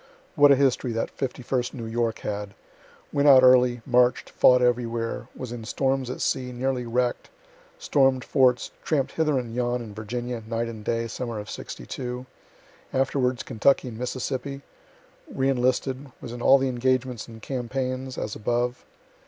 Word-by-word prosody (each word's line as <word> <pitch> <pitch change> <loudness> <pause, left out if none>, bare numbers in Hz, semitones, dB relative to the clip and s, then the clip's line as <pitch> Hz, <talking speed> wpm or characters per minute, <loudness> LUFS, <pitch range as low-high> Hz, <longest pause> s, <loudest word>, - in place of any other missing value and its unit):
(What 145 0 +6
a - - +8
history 130 -2 +1
that 115 - -3
51st 125 -1 -2
New 115 -3 -6
York 115 0 -1
had! 105 -1 -4 0.6
Went 145 0 +3
out 130 -2 +8
early 125 -2 +5
march'd, 125 -1 +2
fought 125 0 +5
everywhere 120 -1 0
was 125 -2 -6
in 120 -2 -6
storms 130 +3 -1
at 125 - -5
sea, 125 -1 -1
nearly 125 0 -2
wreck'd 125 +1 -1 0.5
storm'd 135 - +2
forts 130 -3 +2
tramp'd 145 -4 0
hither 155 -3 +1
and 120 -3 -4
yon 120 0 0
in 110 -3 -8
Virginia, 120 +3 -4
night 115 +1 -1
and 110 -2 -8
day, 115 +1 -1
summer 120 0 -5
of 105 0 -6
'62 125 -1 -6 0.7
afterwards 130 -1 0
Kentucky 130 +3 +2
and 110 -1 -9
Mississippi 130 +2 -4 0.7
re 135 0 0
enlisted 130 +1 0
was 120 - -8
in 120 - -7
all 135 - +7
the 135 0 0
engagements 130 -1 0
and 115 -1 -11
campaigns, 130 +1 -3
as 105 - -3
above.) 120 +3 -1
125 Hz, 155 wpm, -25 LUFS, 120-130 Hz, 0.7 s, a